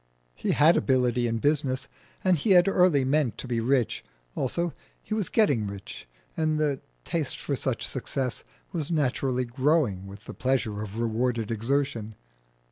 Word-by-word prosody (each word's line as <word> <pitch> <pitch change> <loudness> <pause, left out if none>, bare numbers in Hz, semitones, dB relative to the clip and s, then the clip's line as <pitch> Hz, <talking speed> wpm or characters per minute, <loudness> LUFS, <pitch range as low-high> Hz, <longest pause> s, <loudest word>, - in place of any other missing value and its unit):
He - - -1
had 160 +4 +6
ability 125 -2 +2
in 115 0 -1
business, 135 0 +1 0.4
and 185 -1 +4
he 190 +6 +2
had 175 +2 +5
early 180 -8 +4
meant 140 -3 +1
to - - -7
be 120 -2 0
rich; 125 0 +1 0.3
also, 170 +6 -1 0.3
he - - -4
was 215 -4 -1
getting 140 - +2
rich, 100 -8 -8 0.3
and 155 -1 +1
the 145 -3 0 0.2
taste 155 -5 -2
for 140 - -2
such 130 -2 -2
success 130 -1 -3 0.3
was 160 -5 -2
naturally 130 -5 0
growing 125 - +1
with 100 +1 -11
the - - -7
pleasure 125 -5 -1
of 105 0 -6
rewarded 115 0 0
exertion. 115 -2 -1
130 Hz, 155 wpm, -27 LUFS, 115-150 Hz, 0.4 s, had